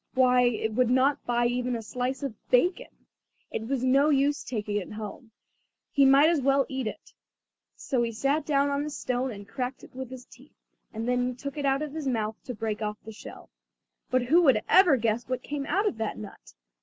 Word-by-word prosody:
Why, 250 -1 +5
it 220 -2 0
would 250 +1 +2
not 265 +3 +2
buy 240 0 +2
even 245 +1 0
a 225 - -5
slice 250 +4 -3
of 275 -5 -3 0.2
bacon. 355 - +2 0.6
It 220 - -4
was 265 -1 -1
no 275 +3 +4
use 285 0 +2
taking 210 -3 -3
it 205 +1 -5
home, 215 +2 -8 0.6
he 280 -1 +4
might 275 +3 +6
as 320 -5 +1
well 275 0 +3
eat 265 -3 -3
it. - - -8 0.6
So 255 -3 -1
he 235 -1 0
sat 275 +7 0
down 285 -1 +1
on 280 +1 0
a 300 - -4
stone 255 -2 -2
and 200 -3 -9
cracked 255 +2 -4
it - - -14
with 260 -1 -6
his 255 -1 -10
teeth, 265 +3 -19 0.4
and 225 +1 -5
then 250 0 0
took 280 +2 -6
it 285 -2 -1
out 275 +2 +1
of 295 -2 -6
his 310 -3 -4
mouth 220 -4 -1
to 250 - -5
break 220 -1 -3
off 210 0 -3
the 220 - -7
shell. 220 - -12 0.6
But 255 -1 +2
who 315 +8 +4
could 255 -9 +4
ever 360 -7 +6
guess 230 +1 -1
what 255 0 -2
came 290 -1 -4
out 395 +6 +1
of 240 - -2
that 220 - -2
nut? 205 - -11
255 Hz, 215 wpm, -27 LUFS, 230-280 Hz, 0.6 s, might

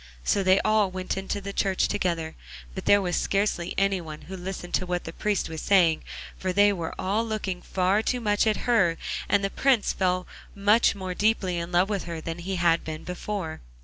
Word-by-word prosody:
So 200 - +2
they 185 0 +4
all 215 -2 +3
went 185 0 -3
into 195 +1 -3
the 200 0 -6
church 195 -2 +1
together, 165 -3 -2 0.4
but - - -6
there 205 -1 +5
was 180 -1 -1
scarcely 195 -3 0
any 195 -1 +2
one 155 -2 -8
who 190 - -8
listened 180 -1 -6
to 185 - 0
what 180 0 -1
the 165 - -7
priest 210 0 -1
was 160 -1 -6
saying, 175 -5 +3 0.3
for 185 - -2
they 205 +2 +4
were 170 -4 -4
all 205 +4 0
looking 210 -5 -3
far 190 +3 +1
too 250 +2 -1
much 210 -1 +1
at 215 - 0
her, 190 -9 +3 0.3
and 200 -1 +3
the 195 - -1
Prince 260 -6 +2
fell 185 -1 0 0.3
much 210 +3 +4
more 185 -2 -4
deeply 190 -3 +1
in 170 +1 -5
love 180 +2 +3
with 200 -2 -2
her 170 -1 -5
than 165 +1 -5
he 190 +2 -3
had 170 -1 +2
been 155 -1 -6
before. 180 - -5
190 Hz, 210 wpm, -26 LUFS, 175-205 Hz, 0.4 s, there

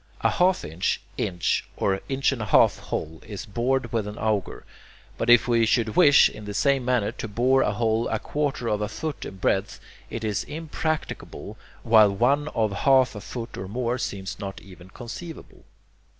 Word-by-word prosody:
A - - +3
half 185 +1 +2
inch, 80 +4 -1 0.2
inch, 85 -2 -1
or 95 -1 0
inch 135 +1 +1
and 130 -4 -4
a - - -2
half - - +4
hole 80 +1 -5
is 105 +3 -7
bored 120 +2 -1
with 110 -3 0
an 105 +2 -7
auger, 105 -3 -2 0.5
but 115 - -2
if 120 +1 +6
we 115 -1 +3
should 110 -1 +1
wish, 145 0 +7
in 105 - -10
the 105 0 -6
same 140 +1 +2
manner, 120 -4 +1
to - - -6
bore 125 +5 +2
a 105 - +1
hole 115 +1 0
a 110 - -1
quarter 140 0 -2
of 105 -2 0
a 105 - -2
foot 150 +7 -5
in - - -8
breadth, 95 +1 -1 0.3
it 115 - -5
is 105 -1 -1
impracticable, 155 +1 -4 0.3
while 110 -2 +6
one 140 +8 +2
of 110 -7 0
half 130 +5 +3
a 105 - -8
foot 115 +3 -7
or 95 - -5
more 120 +4 -2
seems 95 -4 -5
not 100 -2 -6
even 90 -1 -14
conceivable. 140 - -10
115 Hz, 185 wpm, -25 LUFS, 105-130 Hz, 0.5 s, wish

